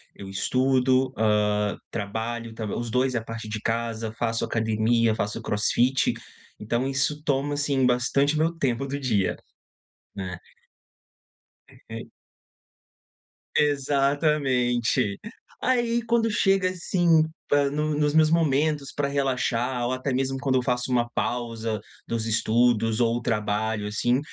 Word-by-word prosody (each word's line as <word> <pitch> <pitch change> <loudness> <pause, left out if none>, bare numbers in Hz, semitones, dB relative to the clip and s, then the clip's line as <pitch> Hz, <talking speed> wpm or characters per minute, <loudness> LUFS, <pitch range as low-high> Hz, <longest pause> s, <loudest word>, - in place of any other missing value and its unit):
Eu 95 - -9
estudo, 130 +5 +2
hã, 105 -1 +1
trabalho 115 +2 -4
tamb 110 -2 -4
os 120 -1 -4
dois 130 +2 +1
a 115 - -1
partir 115 -1 -7
de 110 0 -3
casa. 115 0 -2
Faço 115 -1 -1
academia, 110 0 +1
faço 105 -1 -3
crossfit. 120 +5 +1 0.5
Então, 120 +5 -1
isso 135 +2 -1
toma, 145 0 0
assim, 140 -2 +1
bastante 140 +4 +2
meu 160 +2 +2
tempo 135 -3 0
do 140 +1 -3
dia, 110 -8 +1 0.8
né. 95 -2 -5 1.5
E - - -7 1.5
Exatamente. 140 -6 +1 0.5
Aí, 240 -2 +2
quando 230 -1 +2
chega 195 -3 +2
assim 175 -2 +2 0.2
pra 145 -1 +3
nu 150 0 -1
nos 150 -1 +1
meus 155 0 +5
momentos 150 -3 +1
pra 145 -1 -1
relaxar 130 -3 0
ou, 125 - 0
até 130 +1 -2
mesmo, 135 +1 0
quando 135 -1 0
eu 130 - +3
faço 125 +1 -1
uma 120 -1 +1
pausa 115 -3 -2 0.3
dos 115 -1 -2
estudos 115 0 +2
ou 120 0 +1
trabalho, 105 -1 -1
assim, 120 +5 +1
125 Hz, 125 wpm, -25 LUFS, 115-140 Hz, 1.5 s, meus